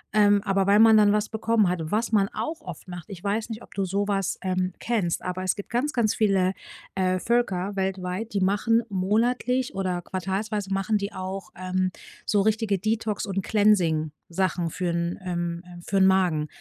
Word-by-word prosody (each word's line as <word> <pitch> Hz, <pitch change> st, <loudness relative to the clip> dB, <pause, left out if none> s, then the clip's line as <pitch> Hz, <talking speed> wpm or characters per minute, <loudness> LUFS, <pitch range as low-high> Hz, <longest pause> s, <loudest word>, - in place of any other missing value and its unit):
Ähm, 205 Hz, -1 st, +5 dB
aber 195 Hz, -1 st, +1 dB
weil 200 Hz, +1 st, +5 dB
man 225 Hz, 0 st, +8 dB
dann 210 Hz, -1 st, +6 dB
was 210 Hz, 0 st, +1 dB
bekommen 220 Hz, -2 st, +2 dB
hat, 180 Hz, -1 st, -1 dB
was 220 Hz, +7 st, -1 dB
man 200 Hz, -2 st, +3 dB
auch 320 Hz, +1 st, -4 dB
oft -, -, -9 dB
macht. 175 Hz, -2 st, -7 dB
Ich 190 Hz, -1 st, -9 dB
weiß 215 Hz, +3 st, -1 dB
nicht, 225 Hz, +1 st, -6 dB
ob -, -, -16 dB
du 195 Hz, -, -1 dB
sowas, 195 Hz, 0 st, -1 dB
ähm, 185 Hz, 0 st, 0 dB
kennst. 210 Hz, -8 st, -1 dB
Aber 180 Hz, 0 st, -3 dB
es 185 Hz, -, +1 dB
gibt 200 Hz, -, -8 dB
ganz, 255 Hz, +5 st, 0 dB
ganz 230 Hz, -6 st, +1 dB
viele, 195 Hz, -3 st, +2 dB, 0.4 s
äh, 185 Hz, -1 st, +1 dB
Völker 200 Hz, -4 st, 0 dB
weltweit, 190 Hz, +2 st, -3 dB
die 200 Hz, -, 0 dB
machen 205 Hz, +5 st, +2 dB
monatlich 235 Hz, +6 st, 0 dB
oder 185 Hz, -2 st, -2 dB
quartalsweise 195 Hz, +2 st, -3 dB
machen 195 Hz, +2 st, +1 dB
die 200 Hz, 0 st, -4 dB
auch, 190 Hz, +1 st, -5 dB
ähm, 185 Hz, 0 st, -1 dB, 0.3 s
so 205 Hz, -2 st, +2 dB
richtige 215 Hz, -1 st, +1 dB
Detox 215 Hz, +1 st, -1 dB
und 195 Hz, -1 st, -2 dB
cleansing 180 Hz, -8 st, +2 dB, 0.2 s
Sachen 175 Hz, -1 st, 0 dB
für 180 Hz, +2 st, -2 dB
'n, 170 Hz, +1 st, -2 dB
ähm 175 Hz, -1 st, -2 dB
ähm 175 Hz, -1 st, -11 dB
für 195 Hz, +3 st, -2 dB
'n 190 Hz, -, +6 dB
Magen. 180 Hz, -5 st, +3 dB
195 Hz, 190 wpm, -25 LUFS, 185-215 Hz, 0.4 s, man